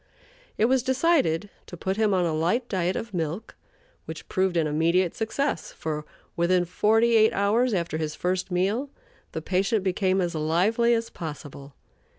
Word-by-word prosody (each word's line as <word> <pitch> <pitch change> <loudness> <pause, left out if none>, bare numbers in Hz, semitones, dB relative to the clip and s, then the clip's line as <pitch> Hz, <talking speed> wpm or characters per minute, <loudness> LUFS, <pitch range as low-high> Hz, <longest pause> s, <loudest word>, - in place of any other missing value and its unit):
It 215 - +3
was 260 +2 +3
decided 260 - +1 0.2
to 175 - -9
put 190 +3 -2
him 215 -1 +2
on 185 -2 +2
a 165 - 0
light 175 +11 0
diet 185 -1 -1
of 225 -2 -5
milk, 170 +5 -3 0.5
which - - -8
proved 185 -2 0
an 165 - +2
immediate 165 +4 +1
success, 275 +6 -2
for, 150 -1 -5 0.3
within 175 +1 +2
forty 225 +6 +2
eight 220 0 +5
hours 220 +5 +2
after 170 -5 -2
his 155 -1 -3
first 185 +2 -2
meal, 200 +10 0 0.4
the 160 - -4
patient 195 +3 0
became 190 0 +1
as 175 -1 -1
lively 185 +10 +2
as 230 0 -3
possible. 145 -3 -8
185 Hz, 165 wpm, -25 LUFS, 170-220 Hz, 0.5 s, eight